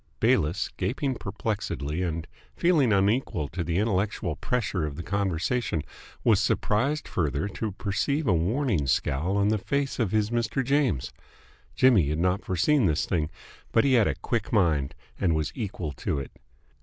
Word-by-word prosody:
Bayliss, 85 +8 +2
gaping 130 +8 -1
perplexedly 100 - -3
and 85 -3 -2 0.3
feeling 155 -9 +3
unequal 100 - +1
to 90 - -3
the 85 +1 -1
intellectual 100 -5 0
pressure 105 -6 -1
of 75 -2 -3
the 85 - -6
conversation, 95 - -1 0.4
was - - +4
surprised 140 +9 0
further 75 +1 -1
to 105 +1 -4
perceive 140 +10 -1
a 105 - +3
warning 95 - +1
scowl 75 +9 0
on 100 0 +3
the 110 0 +1
face 140 +6 -1
of 115 -5 +1
his 110 0 +1
Mr. 120 +2 0
James. 135 - +1 0.6
Jimmy 115 - +5
had 75 - -1
not 90 +4 +1
foreseen 100 - +2
this 75 -2 +1
thing, 80 -5 0 0.4
but 115 - +4
he 135 -1 +3
had 115 -4 +5
a - - 0
quick 115 -4 -2
mind 80 -10 +2 0.2
and 85 -4 +2
was 80 -1 -1
equal 95 - -4
to 70 +2 -3
it. 70 - -5
100 Hz, 160 wpm, -27 LUFS, 80-120 Hz, 0.6 s, Jimmy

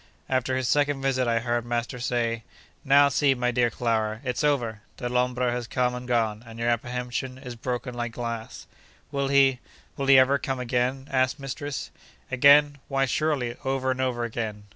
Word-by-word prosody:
After 130 0 0
his 130 -1 -1
second 145 -1 +1
visit 130 -2 +1
I 115 -1 +2
heard 120 0 -1
master 120 +1 -3
say: 115 -2 -1 0.4
'Now, 140 +1 +6
see, 140 -1 +3
my 125 0 0
dear 120 -1 +2
Clara, 110 -2 -1
it's 125 0 -2
over! 120 -8 0 0.2
Dellombra 125 0 0
has 120 -1 -3
come 125 +1 0
and 125 0 -6
gone, 110 -3 0
and 115 -1 -12
your 115 +1 0
apprehension 125 +2 -2
is 130 -2 -8
broken 125 +1 -4
like 120 -1 -4
glass.' 115 -2 -5 0.5
'Will 140 -1 -1
he—will 135 0 0
he 135 -1 +8
ever 135 +2 +5
come 135 -1 -3
again?' 125 +2 -1
asked 130 +1 +1
mistress. 140 +1 -5 0.4
'Again? 140 +2 +5
Why, 135 -1 +1
surely, 135 -3 -1
over 135 -1 0
and 130 0 -2
over 125 -2 -1
again! 110 -3 -4
125 Hz, 170 wpm, -26 LUFS, 120-135 Hz, 0.5 s, he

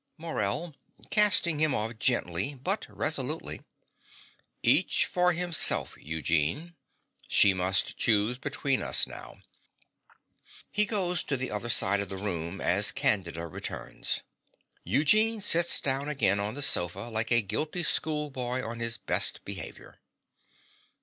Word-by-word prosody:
MORELL 160 -1 -4 0.4
(casting 180 -7 +4
him 155 -3 +2
off 110 +1 -3
gently, 110 +1 0
but 185 +11 -3
resolutely). - - -3 1.0
Each - - +3
for 180 0 +1
himself, 175 -1 +2
Eugene. 80 - -2 0.5
She 100 - +5
must 95 +1 0
choose 115 +2 +1
between 135 -1 -2
us - - +4
now. - - -12 1.3
(He 210 0 +5
goes 185 -5 -1
to 135 - -2
the 130 +1 -4
other 105 +3 -4
side 100 -3 +3
of 100 -2 -5
the 95 - -6
room 90 -2 -5
as 100 +3 +3
Candida 95 - -1
returns. 80 - -5 0.6
Eugene 215 - +2
sits 170 -4 +4
down 140 +1 -2
again 100 -9 +1
on 105 +3 -3
the 145 - 0
sofa 90 -5 +2
like 110 0 -2
a 120 -1 +4
guilty 155 - -3
schoolboy 135 -6 -1
on 115 +1 -6
his 115 0 -1
best - - +2
behaviour.) - - -9
125 Hz, 125 wpm, -27 LUFS, 100-155 Hz, 1.3 s, She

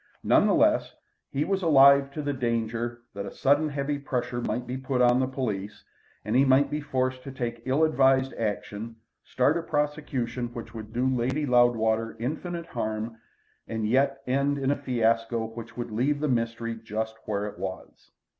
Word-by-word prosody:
None - - +4
the - - +3
less, - - +2 0.3
he 140 +2 -1
was 195 -1 0
alive 140 -4 +6
to 150 - -4
the 145 0 -1
danger 120 -1 -2
that 100 0 -5
a - - -6
sudden 145 +3 +2
heavy 145 0 -2
pressure 125 -3 -3
might 120 +2 -2
be 125 +1 -4
put 130 0 -2
on 125 0 +5
the 130 - +1
police, 105 -6 -4 0.4
and 110 +2 -1
he 135 - +6
might 140 +1 +4
be 150 +1 -2
forced 130 -2 -1
to 135 - -8
take 120 -3 -4
ill 135 +5 +2
advised 135 -3 +3
action, 110 +1 -4 0.3
start 140 +6 +2
a - - -1
prosecution 145 -6 -2
which 115 -1 -7
would 110 -1 -8
do 120 +3 0
Lady 130 +3 0
Loudwater 115 -3 +2
infinite 165 +7 -4
harm, 110 -4 -4 0.5
and 110 -1 -2
yet 135 +3 +2
end 140 +2 +1
in 135 0 0
a - - +2
fiasco 115 -3 0
which 115 +1 -9
would 120 -1 -4
leave 135 +7 +1
the 150 - 0
mystery 115 -2 -1
just 110 0 -4
where 105 -1 -1
it 105 - -7
was. - - -7
125 Hz, 180 wpm, -27 LUFS, 115-140 Hz, 0.5 s, alive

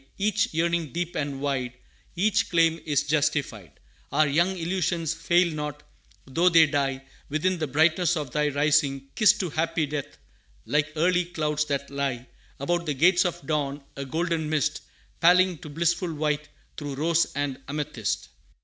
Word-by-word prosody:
Each 205 +1 +1
yearning 165 -1 0
deep 175 0 -3
and 140 -2 -3
wide, 130 -3 -1 0.4
Each 200 +3 +1
claim, 165 -1 +3
is 145 -3 +2
justified; 145 - -1 0.4
Our 150 +2 +3
young 175 +7 +1
illusions 170 -2 -1
fail 175 0 +2
not, 150 -1 -5 0.4
though 165 +7 +3
they 165 -2 +7
die 135 -3 -1 0.3
Within 170 +5 0
the 155 - -1
brightness 160 +5 +2
of 145 -5 -4
Thy 150 +2 +1
Rising, 145 -2 +1
kissed 210 -1 +4
To 180 -4 -3
happy 160 0 0
death, 145 -1 -5 0.5
like 150 +1 0
early 180 +2 +2
clouds 150 -3 -1
that 140 -1 -3
lie 135 -3 -2 0.3
About 170 +4 -1
the 150 - -1
gates 175 +6 +4
of 175 -5 -3
Dawn, 145 -1 -2
a 140 - -4
golden 160 +2 -2
mist 155 -3 0 0.4
Paling 180 0 +4
to 150 - -9
blissful 170 +3 0
white, 150 -1 -2 0.3
through 145 -2 -5
rose 165 +4 +2
and 145 -1 -2
amethyst. 145 +1 -3
155 Hz, 155 wpm, -26 LUFS, 145-170 Hz, 0.5 s, they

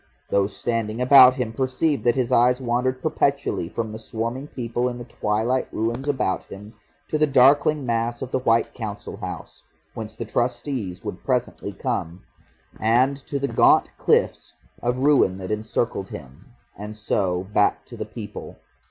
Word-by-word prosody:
Those 100 0 +1
standing 115 -1 -2
about 130 0 +8
him 125 -4 -3
perceived 135 +4 0
that 120 - +4
his 125 -3 0
eyes 125 +2 +4
wandered 130 +1 -1
perpetually 140 - 0
from 110 -2 -4
the 110 - -7
swarming 115 +5 -4
people 120 -2 -2
in 120 - -6
the 120 - -7
twilight 115 +2 -1
ruins 115 +5 -2
about 130 -9 0
him 105 +3 -11 0.3
to 155 - -1
the 155 - +4
darkling 140 +2 +4
mass 120 +1 -1
of 130 - -7
the - - +1
White 115 -2 +2
Council 105 -4 -6
House, - - -8 0.3
whence 110 -1 -7
the 115 - -5
Trustees 120 -4 -2
would - - -6
presently - - -1
come, 85 +3 -4 0.6
and 125 +5 +3
to 140 - -2
the 140 0 -1
gaunt - - +4
cliffs - - +1 0.3
of 120 +1 0
ruin 130 -9 +3
that 95 +1 -6
encircled 110 -1 -2
him, 70 - -11 0.3
and 105 +1 -8
so 95 -4 0
back 105 - +2
to - - -11
the - - -4
people. - - -8
120 Hz, 160 wpm, -23 LUFS, 110-130 Hz, 0.6 s, about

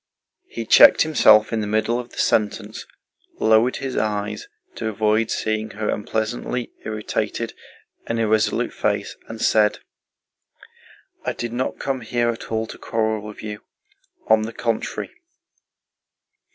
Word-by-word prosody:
He 115 - -6
checked - - +8
himself 110 -9 +5
in 110 - 0
the 105 - -3
middle 110 +3 +1
of 125 0 -7
the - - -16
sentence, 105 -1 0 0.5
lowered 110 +3 +4
his 135 -1 -4
eyes 105 0 -2 0.3
to - - -4
avoid 110 +1 +1
seeing 110 0 -1
her 105 +1 -4
unpleasantly 110 +3 -2
irritated 110 -1 -3 0.5
and 115 0 -1
irresolute 110 -1 +1
face, - - -1
and 115 0 -8
said: 105 -2 +3 1.5
"I - - -1
did 120 -1 -5
not 125 +2 -2
come 135 -2 -2
here 120 +1 0
at 115 - -9
all 110 0 0
to - - -10
quarrel 110 -1 -1
with 105 0 -10
you. 105 -1 -6 0.6
On 110 0 +4
the 110 +1 -4
contrary..." 115 -2 -3
110 Hz, 135 wpm, -22 LUFS, 110-115 Hz, 1.5 s, checked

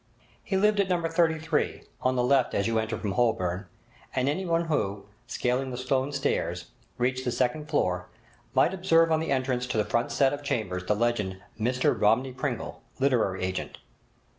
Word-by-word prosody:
He 195 - -1
lived 210 +1 +3
at 195 -2 +2
No. 175 -2 +1
33, 160 -1 0 0.2
on 130 0 +1
the 125 - +2
left 130 0 +3
as 100 - +1
you 115 0 +1
enter 110 +1 -2
from 105 - -3
Holborn, 95 -4 0 0.5
and 130 0 +1
anyone 170 +2 0
who, 100 -11 -1 0.2
scaling 125 +2 -1
the 125 - -5
stone 130 +2 0
stairs, 90 -11 -2 0.3
reached 130 +1 0
the 125 - -1
second 125 +5 0
floor, 90 - 0 0.5
might 180 - +4
observe 165 -3 +3
on 160 - +3
the 160 - -3
entrance 130 -2 0
to 125 - -2
the 105 - +2
front 115 +3 0
set 135 0 +3
of 145 - -4
chambers 110 -10 -2
the 105 - +3
legend, 105 -4 0 0.2
'Mr 125 +3 +2
Romney 125 +5 +3
Pringle, - - -4 0.2
Literary 120 -9 +1
Agent'. 95 0 -3
130 Hz, 175 wpm, -27 LUFS, 110-150 Hz, 0.5 s, might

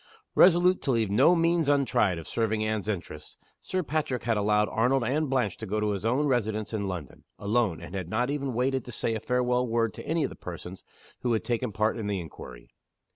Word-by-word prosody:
Resolute 180 +1 +5
to - - -4
leave 115 -5 +1
no 135 - +5
means 165 -2 +2
untried 125 -10 +2
of 80 - -8
serving 110 -1 0
Anne's 110 -1 -2
interests, 85 -7 -5 0.2
Sir 185 -1 -2
Patrick 150 -4 -2
had 115 -1 +1
allowed 105 0 +2
Arnold 125 +3 +2
and 145 +5 0
Blanche 130 -2 0
to 110 - -7
go 105 +3 -1
to 105 0 0
his 100 -1 -3
own 130 +6 +2
residence 110 -5 -1
in 100 -2 -1
London, 85 -8 -6
alone, 105 -4 0
and 85 +2 -10
had 95 -3 -4
not 125 +7 0
even 140 -4 -2
waited 130 +1 0
to 125 - -8
say 115 0 -1
a 110 - -2
farewell 125 +1 +1
word 115 -1 0
to - - -10
any 160 0 +1
of - - -2
the - - -9
persons 90 +1 -8 0.4
who 120 -2 0
had 110 - 0
taken 120 -1 -1
part 110 +2 0
in 105 - -3
the 100 -2 -1
inquiry. 65 -7 -10
115 Hz, 220 wpm, -27 LUFS, 105-135 Hz, 0.4 s, Resolute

